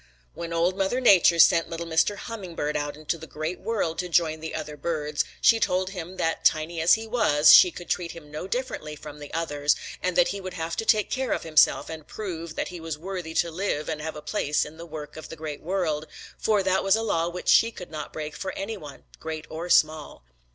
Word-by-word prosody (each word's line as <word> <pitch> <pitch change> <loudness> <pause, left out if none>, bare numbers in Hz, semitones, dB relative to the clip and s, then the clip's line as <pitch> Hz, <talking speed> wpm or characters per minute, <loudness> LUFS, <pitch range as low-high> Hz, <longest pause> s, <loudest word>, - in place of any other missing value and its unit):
"When 170 0 -6
Old 170 +2 +1
Mother 195 +6 +1
Nature 190 -8 +6
sent 165 0 +5
little 170 0 -5
Mr. 165 +5 +2
Hummingbird 180 -10 -5
out 145 0 -2
into 155 +2 -3
the 160 - -10
Great 155 +4 -4
World 200 -8 -2
to 180 - -2
join 160 -2 +2
the 160 0 -6
other 150 -1 -5
birds, 150 -1 -1 0.2
she 230 - +5
told 185 -2 0
him 180 -1 -7
that 165 - -1
tiny 160 +1 +2
as 165 - +6
he 220 0 -6
was 155 -11 +5
she 180 - +9
could 175 0 -10
treat 170 -1 -2
him 155 -3 -12
no 155 +5 -5
differently 195 -10 -4
from 150 0 -10
the 145 - -9
others, 145 -3 +1 0.3
and 185 -1 -1
that 175 -1 +4
he 200 0 -4
would 185 -1 -7
have 165 -1 -3
to 225 - -2
take 215 -2 +3
care 260 -1 0
of - - -3
himself 155 -2 +4
and 160 -2 -8
prove 170 -6 -6
that - - -2
he 180 -1 -8
was 160 -2 -5
worthy 175 -1 -6
to 170 - +1
live 160 -4 -2
and 155 -1 -3
have 160 +1 -5
a 150 - -8
place 150 -8 0
in 150 +2 -11
the 170 +1 -9
work 155 -2 -8
of 155 - -9
the - - -7
Great 150 -2 -6
World, 160 -4 -1 0.3
for 210 -3 +1
that 190 0 +1
was 195 +1 +4
a 225 - -1
law 170 -6 0
which 180 +1 -7
she 230 - +6
could 180 -7 -10
not 155 -1 -6
break 150 -1 -6
for 190 - -4
any 210 +3 -4
one, 145 -6 -11 0.2
great 160 -1 -5
or 165 +3 -5
small. 155 - +2
165 Hz, 235 wpm, -26 LUFS, 155-185 Hz, 0.3 s, she